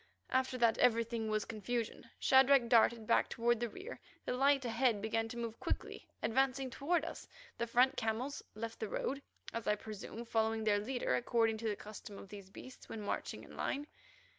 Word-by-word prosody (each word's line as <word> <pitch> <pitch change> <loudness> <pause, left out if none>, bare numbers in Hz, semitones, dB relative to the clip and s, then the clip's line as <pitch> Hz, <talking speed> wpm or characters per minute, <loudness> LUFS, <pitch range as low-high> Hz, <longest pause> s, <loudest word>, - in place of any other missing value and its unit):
After 260 0 +1
that 235 -2 +3
everything 230 -2 +2
was 215 -1 0
confusion. 230 +1 -3
Shadrach 265 -1 +6
darted 230 -1 +5
back 230 - +3
toward 235 0 +1
the 240 0 -1
rear. 480 - -8 0.3
The - - -1
light 275 +1 +3
ahead 235 -1 +2
began 225 +2 0
to 235 - -7
move 230 -1 -4
quickly, - - -3 0.2
advancing 265 +1 +1
toward 320 +5 +1
us. 330 - -7 0.3
The 235 - 0
front 255 +4 +4
camels 240 +5 -1
left 230 +1 -5
the 220 - -3
road, 275 +6 -2 0.3
as 230 -1 -4
I 210 - +4
presume, 215 +2 -7
following 225 -1 +1
their 210 -1 +3
leader 245 - -1
according 225 - +2
to 225 - -2
the 210 - -1
custom 210 -1 -9
of 195 - -10
these 200 -2 -10
beasts 255 +6 -12
when 220 - -5
marching 205 - -3
in - - -12
line. 285 +2 -2
230 Hz, 185 wpm, -35 LUFS, 220-255 Hz, 0.3 s, Shadrach